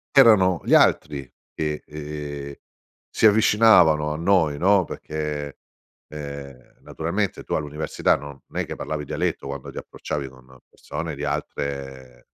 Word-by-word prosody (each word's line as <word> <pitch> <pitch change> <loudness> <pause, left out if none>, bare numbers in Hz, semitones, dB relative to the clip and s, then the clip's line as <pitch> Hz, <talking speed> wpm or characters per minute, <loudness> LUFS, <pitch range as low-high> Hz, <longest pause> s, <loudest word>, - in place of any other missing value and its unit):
Erano 95 -9 +6
gli - - +2
altri 70 -4 +3 0.2
che, 75 -1 -3
ehm, 75 -1 -6 0.6
si - - +1
avvicinavano 105 -8 +5
a 75 - -3
noi, 85 -4 +2
no, 95 +4 +4
perché, 75 -3 -5 0.5
ehm, 70 -3 -9
naturalmente 90 +4 -3
tu - - -5
all'università 75 0 0
non 70 0 -10
è - - -2
che - - -6
parlavi 75 -1 -4
dialetto 70 - -2
quando 70 -1 -6
ti - - -13
approcciavi 70 -2 -5
con 65 0 -17
persone 80 -2 -6
di 70 - -6
altre 70 -3 -5
75 Hz, 130 wpm, -23 LUFS, 70-80 Hz, 0.6 s, Erano